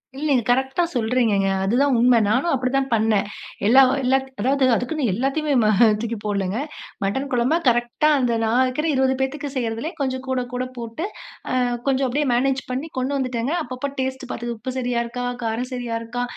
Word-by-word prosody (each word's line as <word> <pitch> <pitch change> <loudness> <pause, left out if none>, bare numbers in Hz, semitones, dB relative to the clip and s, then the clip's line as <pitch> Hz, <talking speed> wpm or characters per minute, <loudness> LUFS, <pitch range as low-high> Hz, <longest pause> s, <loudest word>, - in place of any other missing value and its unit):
இல்ல, 285 +3 -4
நீங்க 250 -4 +3
கரெக்ட்டா 265 +6 +2
சொல்றீங்கங்க. 225 -4 +2 0.2
அதுதான் 255 +7 +2
உண்மை. 245 0 +5
நானும் 260 +11 +1
அப்படிதான் 265 +1 0
பண்ணேன், 215 -2 +2 0.4
எல்லா 260 +5 +7 0.2
எல்லா 260 +1 +3 0.2
அதாவது 265 +5 +2
அதுக்குன்னு 260 +3 -1
எல்லாத்தையுமே 275 +7 0
ம - - +3 0.3
தூக்கி 230 0 -3
போடலங்க. 200 -1 -1 0.5
மட்டன் 265 +8 -1
குழம்பு 250 +6 +2
கரெக்டா 240 +5 +2
அந்த 245 -2 +1
நான் 235 +3 +2
இருக்குற 280 +5 -1
20 265 0 +2
பேத்துக்கு 280 +2 -2
செய்யுறதுலே, 235 +5 -2
கொஞ்சம் 260 -1 -2
கூட 260 -1 0
கூட 250 +1 -1
போட்டு 235 +9 -5 0.5
அ 255 - 0 0.3
கொஞ்சம் 270 0 +2
அப்படியே 290 +4 0
மேனேஜ் 265 +2 +1
பண்ணி 270 +6 -3
கொண்டு 260 +2 -1
வந்துடேங்க. 255 +1 -2
அப்பப்ப 255 +1 -5
டேஸ்ட்டு 260 0 -3
பாத்து, 240 0 -4
உப்பு 255 +4 -5
சரியா 245 -2 0
இருக்கா? 245 +1 -5 0.2
காரம் 230 +3 -2
சரியா 245 -2 -3
இருக்கா? 245 +2 -4
255 Hz, 170 wpm, -22 LUFS, 235-270 Hz, 0.5 s, எல்லா